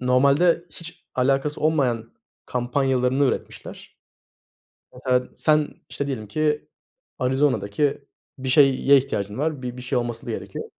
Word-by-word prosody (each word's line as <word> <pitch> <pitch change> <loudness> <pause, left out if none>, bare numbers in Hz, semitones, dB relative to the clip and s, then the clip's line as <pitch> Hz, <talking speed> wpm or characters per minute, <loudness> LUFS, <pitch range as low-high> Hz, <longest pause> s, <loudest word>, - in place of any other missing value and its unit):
normalde 140 +7 +3
hiç 165 0 -10
alakası 135 +3 +1
olmayan 130 -8 0 0.3
kampanyalarını 130 +1 +1
üretmişler. - - -5 0.9
Mesela, 125 0 0
sen, 155 -1 +2 0.2
işte, 140 - -4
diyelim 115 -7 -4
ki 150 +5 -1 0.5
Arizona'daki 130 0 0 0.3
bir 130 0 -4
şeye 135 0 +5
ihtiyacın 105 -5 -1
var, 150 -2 -1
bir 125 0 -5
bir 125 - -8
şey 125 0 0
olması 120 -1 -4
da - - -4
gerekiyor 110 - -5
130 Hz, 120 wpm, -23 LUFS, 125-145 Hz, 0.9 s, şeye